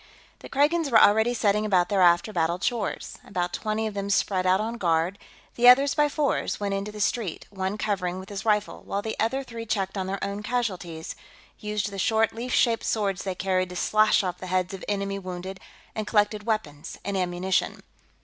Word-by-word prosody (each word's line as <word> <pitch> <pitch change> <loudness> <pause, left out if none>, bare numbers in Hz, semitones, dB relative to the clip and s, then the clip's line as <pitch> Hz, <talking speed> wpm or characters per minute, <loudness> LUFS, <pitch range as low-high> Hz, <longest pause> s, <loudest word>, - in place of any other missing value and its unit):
The - - -11
Kragans 295 +3 +2
were 225 -4 +6
already 220 +4 +5
setting 210 -1 +2
about 185 -4 +2
their 200 -2 +2
after 175 +4 +4
battle 170 -1 +1
chores. 215 +2 -3
About 180 -2 -3
twenty 215 +1 -2
of 215 - -3
them 200 0 -3
spread 185 -2 +1
out 185 +1 +4
on 230 +2 -3
guard; 170 +2 +1 0.3
the 245 +1 +3
others, 275 +2 +6
by 295 0 +2
fours, 290 -1 -1
went 200 -1 -1
into 195 +1 -3
the 210 - -9
street, 210 -4 -1
one 190 +1 -3
covering 185 -4 -1
with 190 +1 -9
his 200 0 -5
rifle 210 -2 0
while 200 +1 -3
the 220 - -3
other 265 +5 0
three 230 -3 -8
checked 195 -2 -1
on 190 - -2
their 195 +1 -2
own 200 +1 -3
casualties, 190 -9 -3 0.4
used 210 -1 -2
the 195 - -6
short, 220 0 +2
leaf 240 +3 -5
shaped 230 -3 +2
swords 200 -4 -1
they 190 -2 -3
carried 185 0 0
to 180 - -8
slash 215 +3 +3
off 180 -1 -3
the 185 - -7
heads 185 +1 0
of 190 - -7
enemy 200 -1 -2
wounded, 185 0 -6 0.3
and 215 -1 -4
collected 210 0 +1
weapons 160 -9 -3
and 200 0 -2
ammunition. 185 0 -1
200 Hz, 200 wpm, -26 LUFS, 185-220 Hz, 0.4 s, were